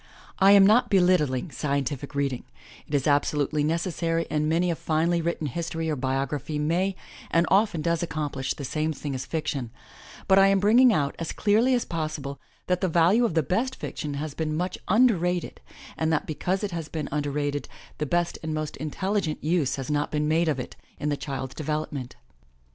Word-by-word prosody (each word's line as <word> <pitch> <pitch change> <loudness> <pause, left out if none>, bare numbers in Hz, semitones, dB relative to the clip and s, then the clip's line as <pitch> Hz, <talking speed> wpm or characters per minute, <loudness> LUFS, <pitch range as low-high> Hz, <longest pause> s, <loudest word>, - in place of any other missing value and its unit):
I 195 0 +7
am 200 -1 +8
not 235 +4 +4
belittling 180 - +2
scientific 140 -1 -2
reading; 140 -3 -1 0.4
it 145 - -2
is 140 - +1
absolutely 145 0 +1
necessary 165 +1 0
and 150 0 +1
many 170 +2 +2
a - - -1
finely 165 +2 +1
written 165 -1 -2
history 165 +2 -3
or - - 0
biography 135 +3 -2
may 175 +6 0 0.3
and 170 +1 +3
often 195 -5 +3
does 170 0 +1
accomplish 145 -5 -3
the 140 - -6
same 155 +3 -1
thing 145 -1 -5
as 130 - -5
fiction, 150 -6 -3 0.6
but 190 0 +6
I 195 - +7
am 195 0 +3
bringing 235 +5 +6
out 145 -8 0
as 165 - -3
clearly 225 +5 +3
as 240 - -1
possible, 155 -4 -4 0.3
that 180 -1 0
the 190 - +2
value 175 +8 +4
of 180 - -1
the 160 - +3
best 235 - -1
fiction 145 -1 -5
has 150 +1 -4
been 155 0 -2
much 180 +2 -2
under 230 +3 +5
rated 175 +1 -2 0.3
and 160 0 0
that 160 - +1
because 180 +6 -2
it 205 - -2
has 165 -3 -4
been 155 -3 -4
under 145 0 -1
rated, 145 0 -2 0.3
the 150 - -1
best 175 +3 0
and 155 -1 -3
most 155 -1 -4
intelligent 165 +3 -2
use 155 -3 +1
has 135 +1 -4
not 145 0 0
been 150 0 -1
made 165 +2 +2
of 140 -4 0
it 125 - -6 0.2
in 150 - -1
the 145 - +1
child's 135 -2 -5
develop 155 0 -3
ment. 130 -4 -6
155 Hz, 195 wpm, -26 LUFS, 145-180 Hz, 0.6 s, am